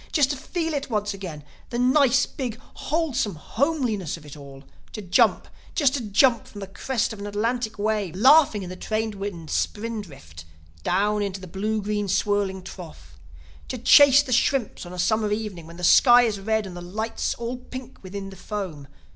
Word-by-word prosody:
Just 290 -3 +3
to - - -2
feel 325 +4 -3
it 280 -1 -3
once 210 -2 -1
again, 175 -7 -7 0.3
the 240 - -3
nice, 265 +1 +4
big, 245 -4 -5
wholesome 280 - -1
homeliness 225 - -1
of 155 - -15
it 145 - -10
all! 140 -2 -12 0.3
To 215 - -5
jump, 180 -1 +3 0.3
just 280 -5 +3
to 280 - -1
jump 230 +4 +3
from 205 - -11
the 195 - -5
crest 225 +5 -2
of 215 - -10
an 205 - -5
Atlantic 220 +2 -2
wave, 205 -4 -1
laughing 260 -1 +5
in 180 - -7
the - - -6
trade 215 +3 -2
wind's 195 -5 -6
spindrift, 185 - -4 0.4
down 205 - +1
into 195 -1 -3
the 185 - -9
blue 210 +4 -2
green 205 0 -1
swirling 195 -1 0
trough! 150 - -11 0.5
To - - -4
chase 285 -1 +7
the 260 -3 -3
shrimps 245 -6 0
on 175 - -9
a - - -8
summer 215 +4 +1
evening, 210 -6 -4
when 170 +1 -12
the 180 - -9
sky 245 +6 +7
is 215 -4 -1
red 220 +1 0
and 185 -2 -8
the 175 - -7
light's 220 +6 -3
all 235 +2 -4
pink 255 0 -10
within 195 +1 -7
the - - -11
foam! 180 -8 -6
210 Hz, 190 wpm, -24 LUFS, 185-245 Hz, 0.5 s, chase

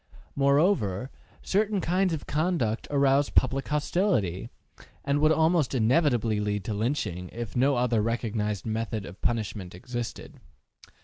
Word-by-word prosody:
Moreover, 140 - +2 0.3
certain 205 +1 +1
kinds 185 +2 +1
of 160 -3 -4
conduct 150 -9 -1
arouse 140 0 +3
public 135 +1 +1
hostility, 145 - 0 0.6
and 140 +1 +1
would 155 +1 +4
almost 160 -4 +2
inevitably 120 -3 +2
lead 105 -1 -2
to 110 - -2
lynching, 100 - -2
if 115 -1 -6
no 135 +3 +3
other 120 -3 +1
recognized 105 -3 -2
method 110 -2 -3
of 90 +2 -11
punishment 105 -6 -2
existed. 120 +4 -6
125 Hz, 125 wpm, -27 LUFS, 110-150 Hz, 0.6 s, would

